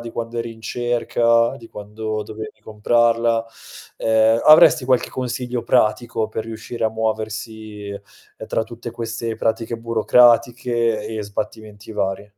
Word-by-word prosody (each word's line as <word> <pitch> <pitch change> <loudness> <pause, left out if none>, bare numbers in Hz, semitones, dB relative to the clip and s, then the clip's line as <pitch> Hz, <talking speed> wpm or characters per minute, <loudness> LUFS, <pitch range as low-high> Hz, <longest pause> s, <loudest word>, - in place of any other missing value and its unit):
di 120 0 -7
quando 115 0 -4
eri 115 0 -4
in 110 - -17
cerca, 115 0 +1
di 115 - -13
quando 110 +1 -5
dovevi 110 +1 -9
comprarla. 115 +1 +1 0.5
Ehm, 110 +1 +3
avresti 155 -2 +7
qualche 130 -1 +2
consiglio 125 -1 -3
pratico 115 -2 +1
per 110 0 -4
riuscire 115 +1 -5
a 110 - +2
muoversi, 110 -1 -4
uhm, 100 0 -12
tra - - 0
tutte 120 +1 -8
queste 115 0 -4
pratiche 115 +1 -1
burocratiche 115 0 +3
e 110 -1 -4
sbattimenti 105 +1 -6
vari? 100 0 -3
115 Hz, 130 wpm, -21 LUFS, 110-120 Hz, 0.5 s, avresti